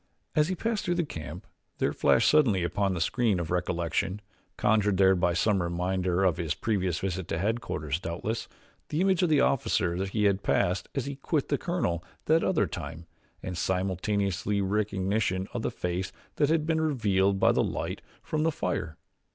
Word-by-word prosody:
As 150 Hz, 0 st, +4 dB
he 185 Hz, -, -1 dB
passed 225 Hz, +3 st, -1 dB
through 175 Hz, -, 0 dB
the 175 Hz, -1 st, 0 dB
camp 80 Hz, -, -7 dB, 0.3 s
there -, -, 0 dB
flashed -, -, +3 dB
suddenly 120 Hz, -, +4 dB
upon 95 Hz, +2 st, 0 dB
the -, -, -2 dB
screen 110 Hz, +2 st, +1 dB
of 85 Hz, -1 st, -4 dB
recollection, 90 Hz, +1 st, -1 dB, 0.4 s
conjured 105 Hz, -2 st, +2 dB
there 95 Hz, 0 st, +6 dB
by 90 Hz, -2 st, +1 dB
some 100 Hz, +1 st, +2 dB
reminder 90 Hz, +1 st, 0 dB
of 90 Hz, -4 st, +3 dB
his 85 Hz, -4 st, -1 dB
previous 95 Hz, -7 st, 0 dB
visit 95 Hz, -2 st, -3 dB
to 80 Hz, -, -2 dB
headquarters, 85 Hz, -, -2 dB
doubtless, 90 Hz, +7 st, -3 dB, 0.4 s
the 150 Hz, -, -1 dB
image 190 Hz, -1 st, +3 dB
of 180 Hz, -, +3 dB
the 150 Hz, -3 st, +4 dB
officer 90 Hz, -8 st, +1 dB
he 105 Hz, +2 st, -1 dB
had 100 Hz, -1 st, +3 dB
passed 90 Hz, 0 st, +1 dB
as 135 Hz, -, -1 dB
he 140 Hz, -1 st, -5 dB
quit 145 Hz, +1 st, -1 dB
the 145 Hz, -, +2 dB
colonel 90 Hz, -, -1 dB, 0.2 s
that 160 Hz, +1 st, +3 dB
other -, -, +2 dB
time 85 Hz, +1 st, -7 dB, 0.4 s
and 90 Hz, -2 st, -4 dB
simultaneously 100 Hz, +3 st, 0 dB
recognition 100 Hz, -1 st, 0 dB
of 120 Hz, -, -2 dB
the -, -, -1 dB
face 90 Hz, -4 st, -3 dB, 0.3 s
that 145 Hz, -1 st, +3 dB
had 160 Hz, -1 st, +2 dB
been 160 Hz, 0 st, +1 dB
revealed 100 Hz, -10 st, +2 dB
by -, -, +5 dB
the -, -, +2 dB
light -, -, -3 dB, 0.2 s
from 155 Hz, -, -1 dB
the 165 Hz, +1 st, +2 dB
fire. 90 Hz, -, -3 dB
95 Hz, 180 wpm, -28 LUFS, 90-130 Hz, 0.4 s, there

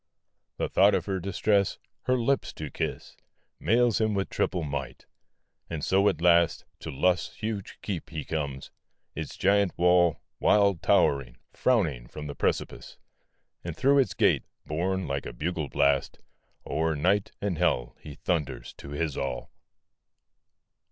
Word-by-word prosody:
The -, -, 0 dB
thought 100 Hz, +2 st, +5 dB
of -, -, -1 dB
her 95 Hz, -2 st, -1 dB
distress, 100 Hz, +2 st, +1 dB, 0.3 s
her 130 Hz, +1 st, +3 dB
lips 130 Hz, +3 st, 0 dB
to 75 Hz, -2 st, -6 dB
kiss, -, -, -4 dB, 0.4 s
Mails 115 Hz, +3 st, +3 dB
him 110 Hz, -1 st, +1 dB
with 95 Hz, -1 st, -2 dB
triple 90 Hz, -3 st, 0 dB
might; 70 Hz, -4 st, -5 dB, 0.6 s
and 80 Hz, -3 st, -3 dB
so 100 Hz, +2 st, +4 dB
at 85 Hz, -5 st, -3 dB
last 85 Hz, -1 st, +4 dB
To -, -, -7 dB
Lust's 90 Hz, +6 st, +1 dB
huge 105 Hz, -2 st, -5 dB
keep 95 Hz, -6 st, -4 dB
he 80 Hz, -3 st, -5 dB
comes; 70 Hz, -4 st, -4 dB, 0.4 s
its -, -, -6 dB
giant 100 Hz, -1 st, +2 dB
wall, 90 Hz, -2 st, +4 dB, 0.2 s
Wild 100 Hz, -4 st, +4 dB
towering, 65 Hz, -4 st, +2 dB, 0.2 s
frowning 80 Hz, -, +1 dB
from 75 Hz, +4 st, -8 dB
the 70 Hz, -, -5 dB
precipice; -, -, -2 dB, 0.7 s
And 85 Hz, -2 st, -5 dB
through 140 Hz, +1 st, +4 dB
its 125 Hz, -8 st, +1 dB
gate, -, -, +3 dB, 0.2 s
borne 95 Hz, +4 st, -1 dB
like 70 Hz, 0 st, -3 dB
a -, -, -7 dB
bugle 80 Hz, +2 st, -3 dB
blast, 70 Hz, -1 st, +1 dB, 0.5 s
O'er 80 Hz, 0 st, 0 dB
night 95 Hz, +7 st, +1 dB
and 95 Hz, -6 st, -2 dB
hell 65 Hz, -8 st, +1 dB
he 75 Hz, -2 st, -10 dB
thunders 75 Hz, -3 st, -2 dB
to -, -, -9 dB
his 75 Hz, 0 st, -2 dB
all. 60 Hz, -, -4 dB
85 Hz, 145 wpm, -28 LUFS, 75-100 Hz, 0.7 s, thought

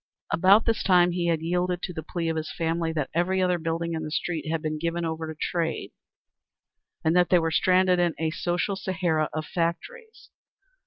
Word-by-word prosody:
About 190 Hz, +7 st, +5 dB
this 225 Hz, -1 st, +1 dB
time 180 Hz, -2 st, +4 dB
he 175 Hz, 0 st, -1 dB
had 165 Hz, -2 st, +1 dB
yielded 180 Hz, +1 st, -1 dB
to 180 Hz, -, -4 dB
the 160 Hz, -, -5 dB
plea 165 Hz, +2 st, -4 dB
of 160 Hz, -, -1 dB
his 155 Hz, -1 st, -3 dB
family, 165 Hz, 0 st, -1 dB
that 150 Hz, -4 st, -3 dB
every 180 Hz, +3 st, +1 dB
other 180 Hz, -1 st, +1 dB
building 165 Hz, +1 st, -2 dB
in 160 Hz, -, -3 dB
the 155 Hz, -, -4 dB
street 160 Hz, +1 st, -3 dB
had 165 Hz, 0 st, 0 dB
been 155 Hz, 0 st, -3 dB
given 170 Hz, +1 st, -2 dB
over 160 Hz, 0 st, -3 dB
to 155 Hz, -, -11 dB
trade, 165 Hz, -2 st, -2 dB, 1.1 s
and 160 Hz, +2 st, +3 dB
that 180 Hz, -1 st, +4 dB
they 180 Hz, -, +5 dB
were 165 Hz, -1 st, 0 dB
stranded 185 Hz, 0 st, +3 dB
in 175 Hz, -2 st, +1 dB
a 160 Hz, -1 st, -1 dB
social 180 Hz, +3 st, -1 dB
Sahara 175 Hz, -5 st, -1 dB
of 155 Hz, 0 st, -4 dB
factories. 440 Hz, -, -4 dB
170 Hz, 200 wpm, -26 LUFS, 160-180 Hz, 1.1 s, About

